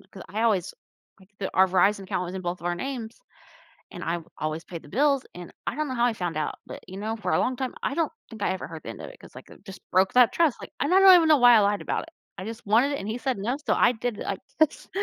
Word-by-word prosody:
because 190 - -13
I 215 +5 -2
always 200 -6 +1 0.5
like, 190 - -19
th 195 - -3
our 190 0 +5
Verizon 195 +2 +2
account 185 -2 -2
was 180 - -7
in 190 - -4
both 175 -1 -3
of 170 - -6
our 175 - 0
names 240 +1 -5 0.7
and - - -8
I've 165 -1 -2
always 155 +1 -3
paid 170 -2 -8
the - - -15
bills, 275 +3 +2
and 175 -1 -9 0.2
I - - -1
don't 305 -1 -2
know 260 - -3
how 240 0 +2
he 235 - 0
found 175 -6 -4
out, 155 -1 -2
but - - -8
you 190 +1 -9
know, 220 +2 -3
for 215 - -3
a - - +3
long 255 0 0
time, 260 0 -3
I 275 - -1
don't 330 -2 0 0.2
think 220 -3 -10
I - - +1
ever 190 - -5
heard 160 -1 -9
the - - -7
end - - -9
of - - -7
it - - -13
'cause, - - -16
like, - - -12
it - - -17
just 195 -2 -10
broke 190 +1 +3
that 250 -2 +6
trust, 325 -6 +1
like, - - -9
and 290 - 0
I 380 - +6
don't 385 -1 +9
even 330 -2 +4
know 305 -2 +6
why 245 -1 +7
I - - +6
lied 205 0 +1
about - - -2
it. 330 - -12 0.3
I 190 - -7
just 225 -1 -8
wanted 240 +7 +3
it 280 - -2
and 195 - -6
he 220 - -2
said 250 -2 -2
no, 240 +7 -1
so - - +2
I 245 - +4
did 240 -1 -4
it - - -5
like 195 - -3 0.2
this. 315 - +1
215 Hz, 310 wpm, -26 LUFS, 185-255 Hz, 0.7 s, don't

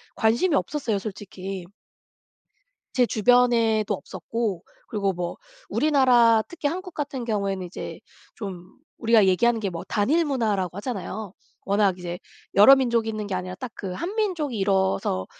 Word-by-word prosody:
관심이 235 +10 +2
없었어요 275 -8 -1
솔직히. 195 -2 -7 1.3
제 250 -3 +3
주변에도 230 -2 +3
없었고 220 -7 -4 0.3
그리고 200 -4 0
뭐 175 -1 -4 0.3
우리나라 245 -5 +4
특히 315 -4 -2
한국 365 +2 -5
같은 275 -4 -4
경우에는 200 -4 -2
이제 175 - -7 0.3
좀 185 -4 -8 0.2
우리가 225 -3 +4
얘기하는 230 +5 +3
게 195 -3 -2
뭐 170 - -6
단일문화라고 220 - 0
하잖아요. 205 -3 -5 0.3
워낙 200 -2 +2
이제 175 0 -5 0.4
여러 210 +7 +9
민족이 235 -4 +1
있는 215 -1 -3
게 195 - -3
아니라 185 0 -4
딱 255 -3 -6
그 190 -2 -5
한민족이 345 - -2
이루어서 190 - +1
220 Hz, 325 characters per minute, -25 LUFS, 195-250 Hz, 1.3 s, 여러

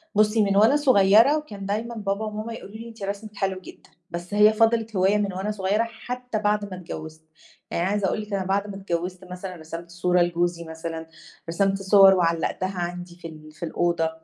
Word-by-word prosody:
بُصّي، 215 +1 +4
من 200 -1 +1
وأنا 220 +7 +6
صغيّرة 250 -1 +5
وكان 210 -11 -7
دايمًا 220 +4 -3
بابا 205 0 -2
وماما 215 +2 -5
يقولوا 215 -2 -10
لي: 220 - -7
"إن - - -10
أنتِ 225 -3 -10
رسمِك 205 +2 -5
حلو 190 -1 -1
جدًا." - - -14 0.2
بس 175 +3 -6
هي 210 +1 +6
فضِلِت 225 0 +2
هواية 190 +2 +3
من 200 -2 -1
وأنا 190 +3 -2
صغيرة 205 +2 0
حتى 245 0 -5
بعد 210 0 +1
ما 195 -2 -7
اتجوّزت، 155 -2 -8 0.5
يعني 170 - 0
عايزة 205 -1 +1
أقول 215 - -1
لِك 210 -1 -8
أنا 195 -1 -1
بَعد 200 +2 0
ما 200 - -7
اتجوّزت 185 -1 -4
مثلًا 180 0 -6
رسِمت 165 +1 -8
صورة 175 +1 +1
لجوزي 175 0 0
مثلًا، 160 0 -6 0.4
رسِمت 195 +3 +1
صوَر 195 0 +7
وعلّقتها 180 +2 0
عَندي 175 0 -5
في 175 -1 -9
ال 155 -1 -12
في 155 - -11
الأوضة. 170 0 0
195 Hz, 200 wpm, -24 LUFS, 175-210 Hz, 0.5 s, صوَر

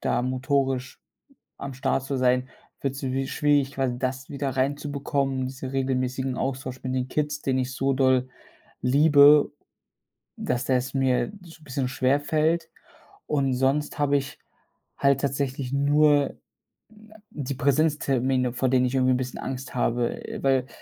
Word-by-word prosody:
da - - 0
motorisch 130 0 -1 0.6
am 140 - -6
Start 135 0 -1
zu 135 0 -2
sein, 125 0 +2 0.3
wird's 140 0 -3
wi 135 0 -1
schwierig, 145 -2 +2
quasi 130 -3 -1
das 130 0 -3
wieder 140 -1 -2
reinzubekommen, 140 -1 -1
diesen 130 0 -6
regelmäßigen 130 -1 -1
Austausch 130 -1 -4
mit 130 - -2
den 130 0 -1
Kids, 150 0 -2
den 130 -1 0
ich 130 0 -2
so 135 +1 0
doll 130 -1 +2 0.5
liebe, 145 +2 +6 0.9
dass 120 - -2
das 130 0 0
mir 135 +7 +1
so 165 -2 -15
bisschen 130 -2 -3
schwerfällt 150 +6 +1 0.6
und 140 -3 +1
sonst 135 +4 0
habe 145 -1 +3
ich 140 +2 -4 0.6
halt 140 -1 +3
tatsächlich 135 -1 -2
nur 145 0 +3 0.7
na 220 - -15
die 140 -2 -4
Präsenztermine, 135 -3 +1
vor 130 +1 0
denen 125 0 +3
ich 125 - -3
irgendwie 130 -1 +3
'n - - +1
bisschen 125 0 -4
Angst 130 0 -6
habe, 120 -1 -1
äh, - - -5
weil 135 -2 +2
135 Hz, 145 wpm, -25 LUFS, 130-140 Hz, 0.9 s, liebe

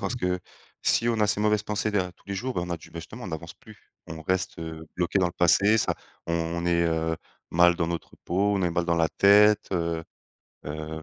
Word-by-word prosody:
parce 125 - -2
que 90 -5 0 0.4
si 115 - +3
on 115 -2 +1
a 105 - +4
ces 105 0 0
mauvaises 105 -1 +2
pensées 105 0 -1
derrière 90 -3 0
tous - - -29
les 100 - -4
jours, 125 +6 -3
ben, 90 - -1
on 90 - -7
a 85 - -1
du - - -15
justement, 85 +9 -8
on - - -5
n'avance 85 +1 -6
plus, 110 -1 -18
on 80 0 -8
reste, 95 +2 -1
heu, 80 -1 -7
bloqué 90 +2 +1
dans 90 - +3
le 85 - -4
passé. 100 +5 +4
Ça - - +1 0.3
on 85 0 -1
est, 85 -1 +3
heu, 80 -1 0 0.3
mal 85 +1 +5
dans 85 - 0
notre 85 -1 -5
peau, 100 +4 +1
on 95 - 0
est 90 - +1
mal 85 0 0
dans 85 -1 +1
la 80 -1 +3
tête, 105 +1 +5
heu 85 -2 -1 0.6
heu, 80 +1 -5
90 Hz, 235 wpm, -26 LUFS, 85-100 Hz, 0.6 s, mal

